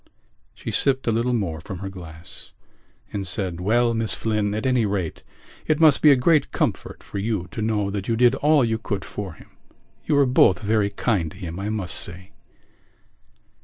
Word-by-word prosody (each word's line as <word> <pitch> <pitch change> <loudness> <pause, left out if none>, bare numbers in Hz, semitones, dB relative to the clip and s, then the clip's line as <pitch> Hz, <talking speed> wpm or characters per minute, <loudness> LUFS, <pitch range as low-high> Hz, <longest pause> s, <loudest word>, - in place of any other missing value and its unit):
She - - -6
sipped 135 -1 +1
a 115 - +2
little 115 +3 0
more 90 -9 -2
from 95 +1 -7
her 95 +2 -6
glass 85 -3 -12 0.6
and 100 -2 -3
said: 95 -2 -2
"Well, 115 +4 +2
Miss 115 -1 0
Flynn, 105 -2 -1
at 110 - -3
any 125 -2 +2
rate 100 -6 -2 0.5
it 155 -1 +2
must 155 -4 +5
be 150 - +7
a 140 - +7
great 150 +4 +2
comfort - - -2
for 100 - -6
you 100 -4 -2
to 110 - -5
know 105 -2 0
that 100 -1 -4
you 115 - +1
did 120 +1 +4
all 150 -3 +3
you 110 -1 -1
could 100 -4 -4
for 100 -4 -6
him. - - -18 0.6
You - - +2
were 140 -1 +5
both 125 -7 +4
very 105 -1 +1
kind 100 -5 -1
to 95 - -14
him, 90 -2 -6
I 100 +2 -3
must 100 -5 -2
say." 90 +1 -6
105 Hz, 195 wpm, -23 LUFS, 95-120 Hz, 0.6 s, be